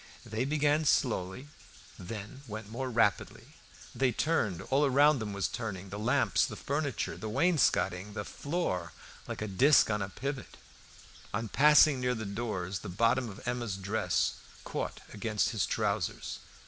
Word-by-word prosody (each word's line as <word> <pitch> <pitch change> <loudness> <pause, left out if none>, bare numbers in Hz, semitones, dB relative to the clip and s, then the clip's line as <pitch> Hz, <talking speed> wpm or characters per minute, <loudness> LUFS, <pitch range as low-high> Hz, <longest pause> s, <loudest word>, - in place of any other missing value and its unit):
They 115 +3 -2
began 150 +1 +2
slowly, 120 -2 +1 0.5
then 105 +7 -7
went 110 -1 -7
more 130 +3 -3
rapidly. 115 -4 0 0.4
They 130 -2 +2
turned; 115 - 0
all 140 +2 +4
around 145 +1 +5
them 110 -2 -4
was 100 -1 -1
turning 100 -5 -5
the 100 +2 -6
lamps, 115 +4 +2
the - - -2
furniture, 140 -3 -2
the 110 - -6
wainscoting, 105 - +2
the 105 -1 -4
floor, 95 - -3 0.3
like - - -4
a - - -3
disc 120 +6 +5
on 105 -1 0
a 95 - -3
pivot. 140 +5 -5 0.8
On 110 +1 -2
passing 150 +1 +6
near 125 0 +1
the 110 -1 -5
doors 100 -3 -3
the - - -8
bottom 115 +6 +2
of 95 - -10
Emma's 120 -5 -2
dress 100 -2 0 0.3
caught - - -4
against 105 0 0
his 110 - 0
trousers. 105 -4 -2
110 Hz, 150 wpm, -31 LUFS, 100-135 Hz, 0.8 s, passing